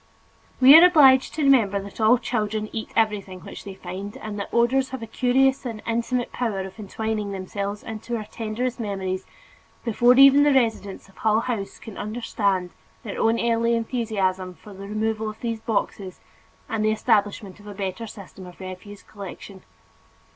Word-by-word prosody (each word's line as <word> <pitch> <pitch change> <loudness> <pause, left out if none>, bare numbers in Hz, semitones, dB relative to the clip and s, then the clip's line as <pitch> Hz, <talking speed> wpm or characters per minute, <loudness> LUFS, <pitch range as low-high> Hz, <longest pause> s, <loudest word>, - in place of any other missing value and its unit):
We 265 +3 +9
are 325 - +10
obliged 275 -7 +6
to 310 - -1
remember 225 -8 +4
that 200 +3 -8
all 220 +3 +5
children 215 -3 -2
eat 220 - -4
everything 200 -4 0
which - - -10
they 195 -1 -8
find 190 +2 -7
and 210 -1 -6
that 200 - -5
odors 255 +3 +2
have 260 -3 -6
a - - -3
curious 265 +4 +2
and 230 -4 -5
intimate 235 +2 -1
power 220 -6 -2
of 190 +2 -9
entwining 215 0 -3
themselves 200 +2 -5
into 225 +2 -5
our 215 - -5
tenderest 230 +3 -4
memories, 190 -3 -3 0.6
before 240 +2 +4
even 275 +1 +8
the 290 -1 +4
residents 220 -7 0
of 195 - -23
Hull 220 0 +2
House 230 -5 -4
can 220 -4 -10
understand 205 -4 -1 0.3
their 205 - -6
own 225 +1 +2
early 235 0 +1
enthusiasm 200 -6 -2
for 205 - -14
the 195 +1 -9
removal 215 +1 -2
of 215 - -10
these 230 -2 -3
boxes 205 -4 -3 0.5
and 220 -1 -2
the 215 - +3
establishment 210 -3 0
of 205 - -15
a 205 - -8
better 195 +3 -4
system 195 -2 -11
of 180 - -14
refuse 190 +2 -9
collection. 200 -1 -10
215 Hz, 170 wpm, -24 LUFS, 200-235 Hz, 0.6 s, are